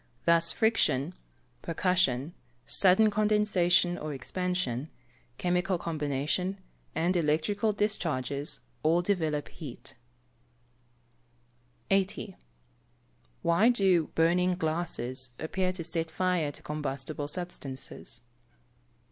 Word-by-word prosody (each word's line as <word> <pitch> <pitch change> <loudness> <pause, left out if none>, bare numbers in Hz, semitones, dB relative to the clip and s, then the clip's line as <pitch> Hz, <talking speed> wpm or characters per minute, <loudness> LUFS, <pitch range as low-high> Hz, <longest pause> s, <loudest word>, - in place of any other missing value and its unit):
Thus 170 0 +5
friction, 185 - +2 0.5
percussion, 165 -5 +1 0.3
sudden 200 +3 +4
condensation 200 -5 +3
or 150 -2 -4
expansion, 160 -2 -2 0.5
chemical 180 +1 +1
combination, 155 +4 -1 0.4
and 175 +3 +1
electrical 170 +7 +1
discharges, 150 - -2 0.2
all 165 +3 +3
develope 160 -7 0
heat. 145 -8 -8 2.0
80. 195 0 0 1.1
_Why 185 +8 +5
do 190 -8 +3
"burning 180 +2 +3
glasses" 155 -7 -2
appear 185 +3 -1
to 180 -2 -5
set 165 0 -1
fire 175 -2 0
to - - -12
combustible 145 -1 -3
substances? 145 -8 -5
170 Hz, 85 wpm, -29 LUFS, 150-185 Hz, 2.0 s, Thus